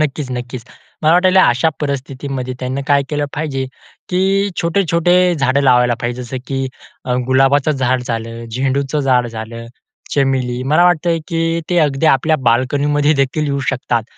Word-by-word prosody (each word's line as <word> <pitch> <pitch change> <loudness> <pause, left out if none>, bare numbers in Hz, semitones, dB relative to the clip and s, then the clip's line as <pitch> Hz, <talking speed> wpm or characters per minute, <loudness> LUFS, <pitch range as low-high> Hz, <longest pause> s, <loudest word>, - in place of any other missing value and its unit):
नक्कीच, 145 -2 -2
नक्कीच. 125 -1 -6 0.4
मला 155 +1 +4
वाटायला 185 +1 +5
अशा 125 +7 +2
परिस्थितीमध्ये 135 -2 -4
त्यांनी 130 +2 -3
काय 140 -1 +3
केलं 145 -1 -1
पाहिजे 140 -3 -2 0.4
की 195 +2 +1
छोटे-छोटे 170 0 +1 0.2
झाडं 135 -2 +1
लावायला 125 -2 +4
पाहिजे 120 +1 -3
जसं 125 +2 -6
की 135 - -3 0.7
गुलाबाचं 135 +3 +3
झाड 130 -3 0
झालं, 115 -1 -5
झेंडूचं 135 +4 -1
झाड 125 -3 +2
झालं, 115 +1 -7 0.5
चमेली 130 -3 0
मला 155 +6 +3
वाटतं 175 -1 +2
की 165 0 0
ते 175 - +2
अगदी 150 -1 +1
आपल्या 155 +2 +3
बाल्कनीमध्ये 145 +5 +1
देखील 150 +3 -2
येऊ 140 -1 -1
शकतात. 120 -3 -1
135 Hz, 145 wpm, -17 LUFS, 125-155 Hz, 0.7 s, वाटायला